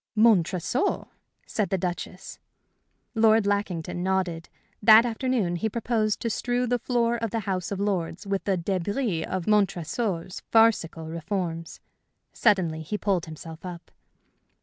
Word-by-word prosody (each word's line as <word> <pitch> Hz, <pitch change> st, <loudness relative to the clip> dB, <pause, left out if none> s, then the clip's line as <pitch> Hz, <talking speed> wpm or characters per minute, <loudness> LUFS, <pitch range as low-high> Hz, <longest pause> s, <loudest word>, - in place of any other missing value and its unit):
"Montresor?" 215 Hz, -, +2 dB, 0.4 s
said 210 Hz, -3 st, -1 dB
the 190 Hz, -, +1 dB
Duchess. 180 Hz, +1 st, -5 dB, 0.7 s
Lord 220 Hz, -2 st, +4 dB
Lackington 190 Hz, -4 st, -1 dB
nodded. 180 Hz, -3 st, -1 dB, 0.3 s
That 220 Hz, +2 st, +8 dB
afternoon 230 Hz, -6 st, 0 dB
he 220 Hz, +6 st, -1 dB
proposed 220 Hz, -1 st, 0 dB
to 230 Hz, -, -1 dB
strew 245 Hz, +3 st, 0 dB
the 245 Hz, 0 st, 0 dB
floor 235 Hz, 0 st, +1 dB
of 230 Hz, -1 st, -2 dB
the 225 Hz, +2 st, -2 dB
House 185 Hz, -2 st, -3 dB
of 200 Hz, -, -3 dB
Lords 190 Hz, -3 st, -2 dB
with 195 Hz, -1 st, -1 dB
the 195 Hz, -2 st, +1 dB
débris 190 Hz, +1 st, -1 dB
of 185 Hz, -2 st, -3 dB
Montresor's 195 Hz, -2 st, 0 dB
farcical 215 Hz, -8 st, +3 dB
reforms. 165 Hz, 0 st, -4 dB, 0.5 s
Suddenly 180 Hz, -8 st, +2 dB
he 160 Hz, +7 st, -3 dB
pulled 195 Hz, -6 st, 0 dB
himself 160 Hz, +1 st, -9 dB
up. 180 Hz, -2 st, -8 dB
195 Hz, 130 wpm, -26 LUFS, 175-225 Hz, 0.7 s, That